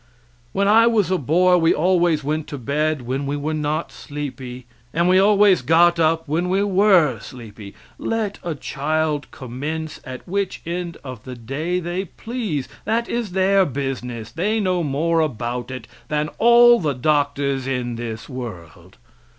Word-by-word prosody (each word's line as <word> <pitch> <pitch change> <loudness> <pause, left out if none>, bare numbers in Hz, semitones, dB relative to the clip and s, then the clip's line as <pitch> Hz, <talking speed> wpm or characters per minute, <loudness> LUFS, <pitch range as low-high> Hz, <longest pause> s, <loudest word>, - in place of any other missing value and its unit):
When 200 0 +1
I 225 +3 +6
was 210 -6 +2
a 185 - +2
boy 180 +6 +3
we 165 -1 +3
always 175 -2 +2
went 155 +2 -2
to 145 - -6
bed 145 +2 -1
when 135 +3 -3
we 145 +1 -1
were 150 +2 -2
not 150 0 -2
sleepy, 130 -4 -7 0.3
and 170 +2 +1
we 185 +1 +5
always 200 -3 +5
got 170 +5 +4
up 165 0 +2
when 170 +5 0
we 195 +2 +2
were 190 -7 +4
sleepy. 110 -6 -11 0.2
Let 220 -3 -2
a 170 -2 -3
child 150 +1 -2
commence 145 +5 -6
at 130 -2 -9
which 200 +1 -2
end 170 0 -4
of 130 -5 -8
the 130 -1 -8
day 145 +10 -3
they 180 +2 -3
please, 205 - -4 0.2
that 230 +1 0
is 230 -6 -3
their 190 +1 +4
business; 125 - -4
they 210 +7 0
know 185 -3 +1
more 165 +3 0
about 125 -4 -2
it 130 0 -7 0.2
than 150 0 -1
all 240 +1 +7
the 150 -5 -1
doctors 140 -1 0
in 125 -2 -2
the 115 -1 -5
world. 115 - -9
155 Hz, 160 wpm, -21 LUFS, 135-185 Hz, 0.3 s, all